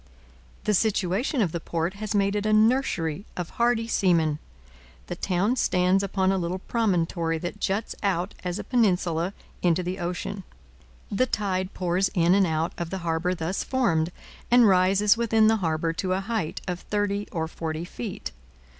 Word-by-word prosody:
The 210 - +1
situation 210 - +1
of 175 - -1
the 170 - -3
port 165 +2 -2
has 215 +1 -4
made 200 0 +2
it 210 0 -1
a - - +2
nursery 215 - +2
of 175 -2 -4
hardy 235 -1 +1
seamen. 165 -8 +2 0.7
The 175 - -5
town 195 +7 0
stands 180 -2 +2
upon 190 -1 +1
a 195 - +1
little 175 +1 -2
promontory 175 -6 0
that 175 +5 -5
juts 205 +3 -1
out 190 -2 0
as 180 0 -2
a - - -5
peninsula 180 -7 +1 0.3
into 175 0 +2
the 180 +2 -4
ocean. 180 +3 -4 0.7
The 255 +6 +2
tide 190 -4 -2
pours 180 +1 +1
in 170 0 +4
and 195 -1 +4
out 160 +1 -1
of 170 -1 -3
the 190 - -3
harbour 165 +2 0
thus 175 +3 -2
formed, 175 -11 +1 0.4
and 240 -1 +6
rises 195 +3 +4
within 225 -2 +3
the 220 +1 +4
harbour 165 -3 -1
to 185 +2 -1
a 185 - 0
height 195 -6 -3
of 180 -1 -2
thirty 205 0 -2
or 160 -4 -2
forty 160 0 -4
feet. 205 +2 -6
185 Hz, 170 wpm, -26 LUFS, 170-210 Hz, 0.7 s, and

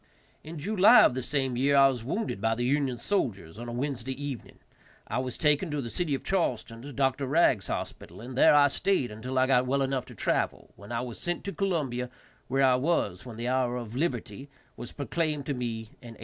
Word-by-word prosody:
In 160 +2 -8
July 210 +8 +6
of - - +4
the 130 - -2
same 135 0 -1
year 140 +3 +3
I 135 0 +8
was 125 -4 -2
wounded 150 - -3
by 110 0 +1
the 120 +1 -2
Union 135 -1 +1
soldiers, 105 - -2
on 120 0 -6
a - - -5
Wednesday 130 0 -3
evening. 140 -4 -6 0.5
I - - -1
was 130 -1 -3
taken 150 +3 +2
to 150 -1 -2
the 120 -4 -4
city 170 -6 0
of - - -7
Charleston, 120 - -1
to 145 +3 -8
Dr. 135 0 0
Regg's 135 - +3
hospital, - - -5
and 125 +3 -8
there 135 - +6
I 145 -1 +7
stayed 140 - 0
until 125 +5 -5
I 130 - +5
got 130 -1 +3
well 140 +1 +1
enough 135 -2 -1
to 125 - -12
travel, - - -1
when 100 +2 -12
I 115 0 -1
was 120 -2 -6
sent 175 0 -3
to 200 - -4
Columbia, 140 -11 -1 0.4
where 135 +2 +1
I 130 -1 +5
was 130 - -1
when 120 - -8
the 120 +2 -4
hour 125 -1 +1
of 120 -1 -7
liberty 130 -4 -3 0.3
was 120 - -8
proclaimed 150 0 -2
to 145 - -1
me, 120 -3 -3 0.2
in 120 -2 -11
1865. - - -18
130 Hz, 220 wpm, -28 LUFS, 120-145 Hz, 0.5 s, I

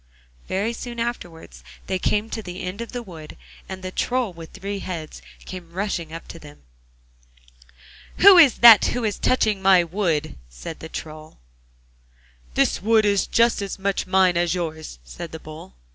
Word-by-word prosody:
Very 205 +5 -1
soon 235 0 -7
afterwards 205 -9 -6 0.2
they 185 - -2
came 210 +3 0
to 225 - -4
the 180 -3 -8
end 185 +5 -5
of 235 - -7
the 245 -1 -5
wood, 160 -7 -11 0.3
and 190 0 -7
the 185 - -5
Troll 245 -1 -1
with 165 -1 -11
three 200 0 -5
heads 170 -5 -7 0.2
came 180 -3 -9
rushing 180 -4 -3
up 165 +1 -9
to 165 - -9
them. 150 -1 -15 1.5
'Who 395 0 +8
is 285 -8 +6
that 225 -3 +10
who 245 - -2
is 210 -2 -2
touching 215 -6 +1
my 190 -2 +5
wood?' 165 -4 -2
said - - -9
the 160 - -9
Troll. 155 0 -9 1.2
'The - - +2
wood 220 +1 +3
is 200 -1 +1
just 235 -2 +2
as 200 -1 -5
much 195 -1 -2
mine 185 -2 +3
as 175 0 +1
yours!' 160 - -5
said - - -9
the 160 - -8
Bull. 155 - -12
185 Hz, 170 wpm, -22 LUFS, 165-215 Hz, 1.5 s, that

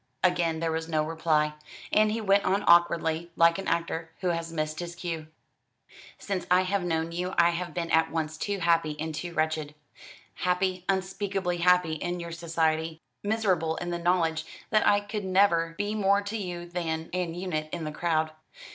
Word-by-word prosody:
Again 175 -3 +2
there 165 -1 0
was 160 0 -3
no 155 -1 +1
reply; 155 -1 +1 0.4
and 215 0 +4
he 225 +1 -2
went 200 -1 +3
on 195 +2 +1
awkwardly, 170 -1 +4
like 170 +2 +4
an 195 - -5
actor 165 -1 -1
who 185 - +1
has 165 -1 -2
missed 155 -1 -2
his 175 -1 -5
cue. 165 -3 -4 0.9
"Since 195 -3 -4
I 180 +1 +5
have 185 0 0
known 165 -1 -1
you 180 +2 -3
I 170 0 +5
have 175 +1 -4
been 170 -1 -2
at 160 0 +4
once 155 -1 -2
too 200 +5 -2
happy 165 -3 +2
and 160 +1 -3
too 175 +3 -5
wretched. 155 -1 -1 0.6
Happy 180 0 0
unspeakably 190 -1 -1
happy 180 -1 +4
in 175 +3 -3
your 170 0 -6
society; 160 -1 -1 0.2
miserable 190 -7 +1
in 175 +1 -4
the 175 - -2
knowledge 170 -2 +1 0.3
that 215 -1 +4
I 205 0 +5
could 205 0 -5
never 185 -3 +3
be 205 +1 -1
more 200 -1 +2
to 200 +2 -4
you 180 -5 -4
than 165 -2 -3
an 180 -2 -2
unit 165 -4 -3
in 170 - -4
the 155 - -3
crowd." 155 0 0
170 Hz, 180 wpm, -28 LUFS, 160-185 Hz, 0.9 s, I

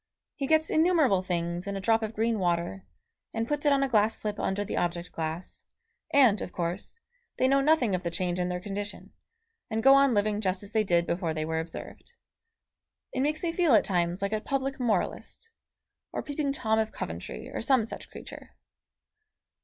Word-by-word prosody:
He 275 - -3
gets 315 +1 +3
innumerable 315 - +4
things 175 0 -2
in 200 - -3
a - - -3
drop 225 +3 +2
of 220 0 -4
green 225 0 +1
water, 175 +1 -1 0.5
and 225 0 -1
puts 295 +1 -1
it - - +5
on 275 -1 +3
a - - +2
glass 220 -3 +2
slip 210 0 -4
under 200 +2 -1
the - - -4
object 175 0 -2
glass, 160 +2 -4 0.5
and, 250 -8 +5
of - - -5
course, 175 - -4 0.4
they 260 - +3
know 275 +1 +4
nothing 275 -7 +3
of 180 - 0
the 175 - -2
change 175 +1 -2
in 180 0 0
their 180 0 -2
condition, 205 +2 -6 0.6
and 220 0 -1
go 270 - +8
on 275 -3 +5
living 210 0 +1
just 185 -1 -1
as 205 - -7
they 220 -1 +2
did 175 -3 +2
before 170 -2 -1
they 155 0 -2
were 160 0 -1
observed. 165 - -8 1.0
It - - 0
makes 305 +4 0
me 340 - +1
feel 330 -7 +4
at - - +4
times 175 0 0
like 200 +2 -1
a 215 - 0
public 270 +1 -2
moralist, 240 - -2 0.6
or - - -3
Peeping 285 -1 -2
Tom 220 -6 +1
of 220 0 0
Coventry, - - -6
or - - -4
some 260 -6 +3
such - - -8
creature. - - -11
215 Hz, 195 wpm, -28 LUFS, 180-270 Hz, 1.0 s, go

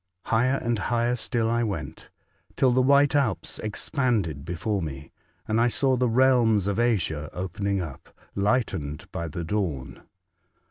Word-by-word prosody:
Higher 125 +4 +2
and 120 -3 -1
higher 120 +4 +1
still 115 -1 -1
I 120 +1 +1
went, 95 - -4 0.5
till 130 - +3
the 130 +1 +3
white 140 +2 +4
Alps 140 -6 0
expanded 105 - -1
before 90 +5 -2
me, 70 -3 -6 0.4
and 110 +2 +2
I 120 - +4
saw 130 +2 +2
the 125 -1 +1
realms 115 -4 +4
of 100 +1 -1
Asia 90 -10 0
opening 95 +1 -2
up, 70 -6 -9 0.2
lightened 100 - -1
by 85 - -4
the 85 +2 -5
dawn. 85 -8 -3
110 Hz, 145 wpm, -26 LUFS, 85-120 Hz, 0.5 s, white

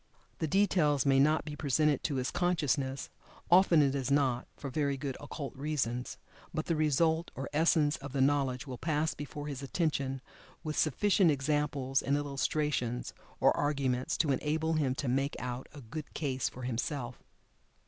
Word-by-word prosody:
The 160 - 0
details 170 -6 +3
may 135 -1 +4
not 155 +3 +3
be 150 -1 -5
presented 150 0 +1
to 145 - 0
his 130 -1 -1
consciousness 145 -6 0 0.4
(often 175 -4 +6
it 135 -1 +2
is 135 -2 -2
not, 135 -3 +2
for 140 - -6
very 140 -1 0
good 135 -1 -4
occult 145 -1 -6
reasons) 130 -4 -2 0.3
by 155 -1 -2
the 165 - -1
result, 160 +2 +2
or 135 +1 -4
essence 155 -1 +3
of 140 0 -8
the 135 - -2
knowledge 135 -1 +2
will 130 -3 -7
pass 155 0 0
before 145 0 -7
his 140 -3 -5
attention, 140 -3 -1 0.4
with 155 -2 -3
sufficient 185 +4 +3
examples 140 -2 0
and 140 +1 +1
illustrations, 140 -3 -1 0.3
or - - +4
arguments 135 -4 0
to 150 -3 +2
enable 155 +4 0
him 140 -5 +1
to 140 - -3
make 135 +3 0
out 125 +1 -5
"a 145 - -11
good 140 +6 -8
case" 135 -4 -1
for 130 - -10
himself. 125 +1 -3
145 Hz, 165 wpm, -31 LUFS, 135-155 Hz, 0.4 s, often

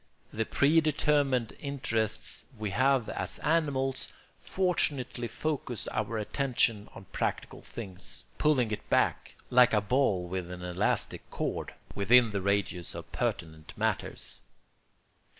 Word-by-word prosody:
The 110 +1 0
predetermined 145 -5 +3
interests 115 -6 -2
we 105 -2 -3
have 130 +2 +3
as - - -2
animals 140 -5 0 0.3
fortunately 140 -10 0
focus 125 -1 -3
our 110 +1 -2
attention 115 -2 +1
on 95 - -10
practical - - -2
things, 95 -5 -6 0.2
pulling 130 -7 +3
it 105 - -5
back, - - +1 0.2
like 125 -1 +6
a - - +5
ball 105 -5 +1
with 90 -1 -4
an 90 0 -7
elastic 90 +3 -1
cord, - - -3 0.2
within 115 +3 +5
the 100 -1 -1
radius 100 -3 -1
of - - -8
pertinent 80 -1 -3
matters. - - -2
115 Hz, 115 wpm, -30 LUFS, 100-135 Hz, 0.3 s, like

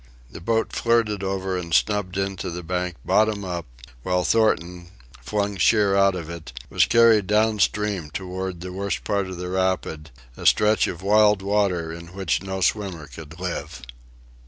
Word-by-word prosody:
The - - -10
boat 115 +4 0
flirted 115 -4 +1
over 95 -1 -2
and 85 -2 -2
snubbed 100 -3 +1
in 95 0 -1
to 95 - -4
the 90 +1 -6
bank 90 0 -2
bottom 105 -2 +2
up, 85 -3 -4 0.3
while 90 +5 0
Thornton, 90 -6 +1 0.3
flung 100 - -2
sheer 100 0 +3
out 100 -1 +4
of 85 -3 -6
it, 85 -6 -8 0.2
was - - +4
carried 115 -4 +5
down 105 +1 +2
stream 100 -6 0
toward 95 +1 -5
the 90 0 -6
worst 100 +1 -3
part 100 -2 -1
of 95 -1 -7
the 90 0 -5
rapids, 95 -5 -1 0.3
a - - -2
stretch 105 -2 +4
of 85 +1 -6
wild 105 -1 +4
water 95 -5 0
in 85 +1 -9
which 95 -1 0
no 95 -1 -4
swimmer 95 -6 -1
could 75 +3 -12
live. 90 -8 -5
95 Hz, 170 wpm, -23 LUFS, 90-105 Hz, 0.3 s, carried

